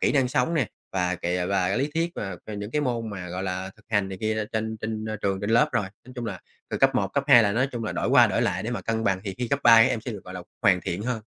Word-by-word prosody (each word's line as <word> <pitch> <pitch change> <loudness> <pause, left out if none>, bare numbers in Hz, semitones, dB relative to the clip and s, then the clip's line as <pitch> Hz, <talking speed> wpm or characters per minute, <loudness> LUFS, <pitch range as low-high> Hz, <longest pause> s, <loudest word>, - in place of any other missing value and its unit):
kỹ - - +2
năng 135 -3 +3
sống 125 +6 +1
nè, 145 -7 +2 0.3
và 90 -1 0
kìa 90 +1 -2
và 95 -2 +1
cái 95 - 0
lý 140 +2 0
thuyết 165 +1 0
mà 95 -3 -5
về 110 - -6
những 100 +1 -5
cái 150 - 0
môn 120 -5 -2
mà, 90 -3 -6
gọi 90 +2 -4
là, 95 0 -3
thực 110 - -23
hành 105 -3 +1
này 95 -1 -7
kia 110 0 0
trên 110 0 -2
trên 110 0 -3 0.2
trường 95 -1 0
trên 105 - -2
lớp 115 +1 +4
rồi. 105 -4 +1 0.2
Nói 125 - -11
chung 120 -2 -5
là, 105 - -5 0.3
từ - - -1
cấp 135 0 +4
1, 100 -6 +1
cấp 140 -1 0
2 125 -5 +8
là 100 -2 +2
nói 125 +5 +2
chung 115 -2 -4
là - - -2
đổi - - -1
qua - - +7
đổi - - 0
lại - - 0
để 115 - -3
mà 120 - -3
cân 115 0 -2
bằng, 95 -2 +1
thì 95 -2 -4
khi 125 -2 -2
cấp 140 0 0
3 115 -1 +8
các - - +4
em 115 - -1
sẽ 120 - -6
được, 100 - -9
gọi 90 - -9
là, 90 - -6 0.2
hoàn 90 -2 +4
thiện 90 +3 -4
hơn. 120 -1 -2
110 Hz, 325 wpm, -25 LUFS, 95-120 Hz, 0.3 s, 2